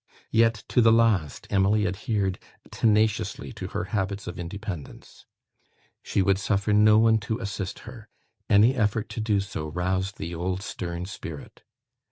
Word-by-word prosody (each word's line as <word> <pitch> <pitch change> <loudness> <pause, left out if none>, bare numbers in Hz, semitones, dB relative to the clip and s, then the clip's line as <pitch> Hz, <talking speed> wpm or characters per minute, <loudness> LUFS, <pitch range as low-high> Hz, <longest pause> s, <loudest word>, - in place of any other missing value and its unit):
Yet, 115 -2 +3
to 125 - +3
the 115 -1 +6
last, 110 -10 +2
Emily 100 +2 +3
adhered 95 0 -1 0.3
tenaciously 110 -1 +1
to - - -6
her - - -3
habits 100 0 -2
of - - -7
independence. 90 -2 -8 0.7
She 100 - 0
would 95 0 +2
suffer 100 +1 0
no 105 +1 +6
one 110 0 +4
to 110 +1 -3
assist 100 -4 -5
her. 110 -2 -11 0.4
Any 105 +5 +6
effort 110 -3 0
to - - -6
do 105 -2 +1
so 95 -5 -4
roused 95 +4 -2
the 85 +2 -5
old 90 +3 -3
stern 85 -3 -5
spirit. 85 -6 -9
100 Hz, 150 wpm, -26 LUFS, 95-110 Hz, 0.7 s, the